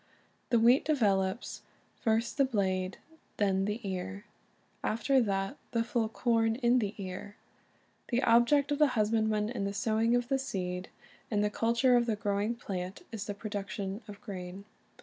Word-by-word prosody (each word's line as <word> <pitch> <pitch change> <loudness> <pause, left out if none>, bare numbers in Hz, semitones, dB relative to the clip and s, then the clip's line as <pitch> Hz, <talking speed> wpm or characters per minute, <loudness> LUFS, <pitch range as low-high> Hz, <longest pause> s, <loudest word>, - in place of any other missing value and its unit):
The 240 - +4
wheat 240 +4 +5
develops, 200 -8 0 0.4
"first 225 +2 0
the - - +7
blade, 190 -6 0 0.4
then 195 -2 +2
the 210 +3 -2
ear, 100 - -4 0.6
after 260 +4 +2
that 195 +3 -1 0.2
the 230 -1 +2
full 230 -1 0
corn 225 -1 +1
in 245 0 +3
the 210 -2 -2
ear." 195 +1 -6 0.7
The 250 +2 0
object 255 +5 +4
of 290 - 0
the 300 - +6
husband 220 +1 +2
man 210 -1 +1
in 235 -4 -3
the 200 0 -2
sowing 220 +2 +2
of 245 0 0
the 270 0 +1
seed 180 -7 -3 0.4
and 210 -2 +1
the 210 - +1
culture 235 +4 +3
of 240 0 +3
the 225 - +1
growing 205 +2 -1
plant 185 - -5
is 220 -2 -5
the 205 - -3
production 200 -1 -4
of 205 -1 -9
grain. 190 -3 -7
215 Hz, 165 wpm, -31 LUFS, 195-235 Hz, 0.7 s, the